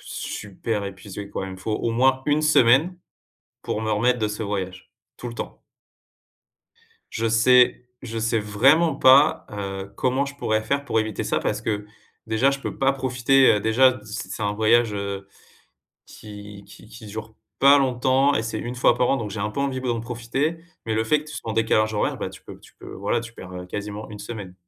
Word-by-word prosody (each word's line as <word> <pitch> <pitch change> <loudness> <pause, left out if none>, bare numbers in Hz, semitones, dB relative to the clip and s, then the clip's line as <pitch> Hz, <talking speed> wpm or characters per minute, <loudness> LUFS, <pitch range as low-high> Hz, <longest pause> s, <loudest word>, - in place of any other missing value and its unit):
super 105 +1 -4
épuisé 100 +1 -8
quoi. 95 - -4
Il 95 - -7
me 95 - -9
faut 100 +4 -4
au 115 - -1
moins 130 +3 +2
1 150 +1 +2
semaine, 155 +4 +4 0.6
pour 105 - -3
me 110 0 -2
remettre 120 +4 +2
de 110 -2 0
ce 105 +2 -5
voyage, 95 -3 -5 0.3
tout 120 - -6
le 115 - -8
temps. - - -7 1.5
Je 115 0 -1
sais, 125 +2 +4
je 115 -3 -6
sais 115 +1 +1
vraiment 135 +10 +3
pas, 135 +2 +5
heu, 100 -1 -5
comment 130 +2 0
je 140 0 -8
pourrais 110 -5 0
faire 140 +6 -1
pour 115 -5 0
éviter 110 -2 -3
ça. - - 0
Parce - - -2
que, 105 -2 -2 0.4
déjà 115 +5 +2
je 140 - -3
peux - - -6
pas 135 0 +3
profiter, 130 0 +3
heu, 105 - 0
déjà. 125 +4 +3
C 110 +2 -7
c'est 110 - -5
un 100 0 0
voyage, 110 +1 +3
heu, 100 -1 -4 0.8
qui 105 -1 -11
qui - - -15
qui - - -12
dure 110 +1 -8 0.2
pas 140 +1 +7
longtemps 130 +1 +2
et 110 - 0
c'est 115 - -4
1 120 +1 -5
fois 125 - +3
par 125 - +2
an, - - +3
donc 110 -5 -4
j'ai 100 +1 -5
un 105 +1 -1
peu 120 - -4
envie 135 -2 -1
ble 130 - -4
d'en 115 -1 -1
profiter, 120 +7 -2 0.3
mais 115 - -2
le 110 +1 +1
fait 150 +6 +2
que - - -12
tu - - -8
sois 115 - -6
en - - -3
décalage 110 -1 +2
horaire 105 - -1
bah, - - -3
tu - - -14
peux - - -11
tu - - -19
peux - - -10
voilà 100 +4 -1
tu 115 -1 -10
perds, 95 -5 -11
heu, 90 0 -7
quasiment 105 +3 -6
1 105 - -8
semaine. 105 -3 -8
115 Hz, 215 wpm, -23 LUFS, 105-130 Hz, 1.5 s, pas